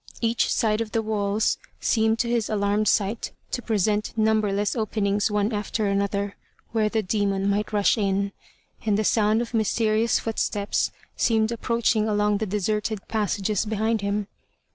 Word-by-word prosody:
Each 230 0 +1
side 215 -1 +1
of 220 -1 -5
the 225 - +2
walls 210 0 0 0.2
seemed 220 -1 +2
to 235 - 0
his 235 -2 0
alarmed 210 0 +1
sight 210 +3 0 0.2
to 245 - -2
present 215 -1 0
numberless 215 -2 +1
openings 210 -3 0
one 210 +2 0
after 210 +1 -1
another 200 0 -1 0.3
(where 220 -2 +1
the 220 0 0
demon 200 0 0
might 205 +2 0
rush 210 +2 +2
in), 200 0 0 0.5
and 210 -2 +2
the 215 - +1
sound 215 +1 +2
of 240 - -10
mysterious 220 +1 +2
footsteps 210 -2 -1 0.3
seemed 220 -1 +2
approaching 230 -2 +1
along 210 -1 +2
the 220 - -2
deserted 210 +1 -2
passages 210 -2 0
behind 220 +1 0
them. 200 +1 -1
215 Hz, 150 wpm, -25 LUFS, 205-220 Hz, 0.5 s, the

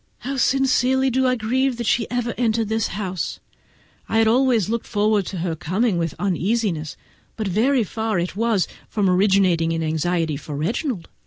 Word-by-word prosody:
How 275 +2 -4
sincerely 265 0 +2
do 260 +1 +2
I 255 - +2
grieve 250 +3 0
that 235 - -3
she 225 +1 +1
ever 240 -1 -2
entered 225 -2 0
this 220 -1 0
house! 185 -2 -4 0.7
I 225 0 +3
always 235 -3 +3
looked 230 +1 -2
forward 210 -2 +1
to 190 - -5
her 165 -3 -1
coming 185 +5 0
with 165 -3 -2
uneasiness; 185 -5 -1 0.4
but 215 -2 -3
very 235 +7 +2
far 220 -1 -2 0.2
was 220 -3 +1
it - - -18 0.2
from 205 -3 0
originating 185 -3 +3
in 165 0 -1
anxiety 160 0 0
for 145 +1 -7
Reginald. 195 - -2
215 Hz, 165 wpm, -22 LUFS, 180-240 Hz, 0.7 s, I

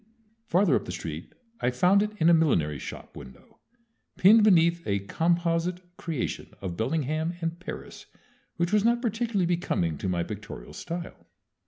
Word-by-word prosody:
Farther 180 -4 +3
up - - -1
the - - -5
street 80 -2 -6 0.3
I 125 - +1
found 180 +11 +4
it 210 - 0
in 165 - +3
a 170 - +7
millinery 80 - +2
shop - - -9
window, 65 - -13 0.6
pinned 215 +4 +7
beneath 170 -4 +4
a 100 -1 0
composite 175 - 0
creation 160 -9 -4
of 90 -3 -5
Bellingham 155 - -1
and 165 0 -3
Paris 180 - -8 0.5
which 170 +3 0
was 210 -1 +4
not 235 +1 +3
particularly 225 -4 0
becoming 130 - -1
to 95 - -2
my 85 -2 0
pictorial 105 +3 -8
style. 170 +1 -7
165 Hz, 155 wpm, -27 LUFS, 110-180 Hz, 0.6 s, a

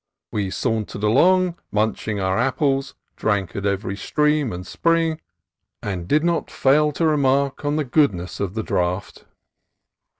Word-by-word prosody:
We 100 -3 -1
sauntered 110 -1 -2
along 175 +10 +3
munch 110 +1 -1
ing 105 -2 -1
our 95 +1 0
apples, 135 +1 0 0.2
drank 100 -4 -1
at 100 0 -2
every 100 0 -2
stream 150 +3 +1
and 90 0 -6
spring, 165 - 0 0.6
and 95 -5 -4
did 150 - +2
not 170 -1 0
fail 150 +3 +3
to 165 - 0
remark 140 -2 +1
on 145 0 0
the 155 -1 0
goodness 120 - +1
of 100 -1 -3
the 110 - -2
draught. 90 +1 -2
125 Hz, 145 wpm, -22 LUFS, 100-150 Hz, 0.6 s, along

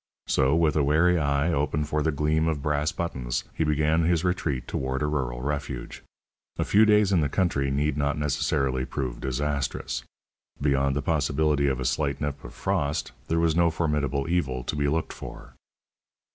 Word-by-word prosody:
So, 65 +3 +2
with 80 -2 +2
a 75 - +3
wary 80 +5 +3
eye 70 +3 +1
open 75 +1 0
for 75 +1 -1
the 80 +2 +1
gleam 75 +2 +1
of 75 -4 -1
brass 75 0 +1
buttons, 65 -8 -3
he - - 0
began 75 +1 +2
his 85 0 +2
retreat 75 -8 -1
toward 65 +2 -2
a - - +2
rural 65 -5 -2
refuge. 70 -3 -4 0.6
A - - +1
few 105 +2 +5
days 105 -2 +4
in 90 -4 +3
the 70 - +1
country 80 -8 +1
need 70 +1 0
not 70 0 0
necessarily 70 -2 0
prove 65 -3 -4
disastrous. 65 -2 -2 0.6
Beyond 70 -1 +1
the 70 - -1
possibility 75 -1 +1
of 65 -2 0
a 65 - -3
slight 70 +3 0
nip 70 -1 -4
of - - -10
frost, 70 -1 -1 0.2
there 80 - +1
was 80 -1 +2
no 85 0 +4
formidable 75 -3 -1
evil 70 -8 -1
to 65 - -3
be 70 -1 0
looked 80 +3 -1
for. - - -10
75 Hz, 180 wpm, -26 LUFS, 70-80 Hz, 0.6 s, few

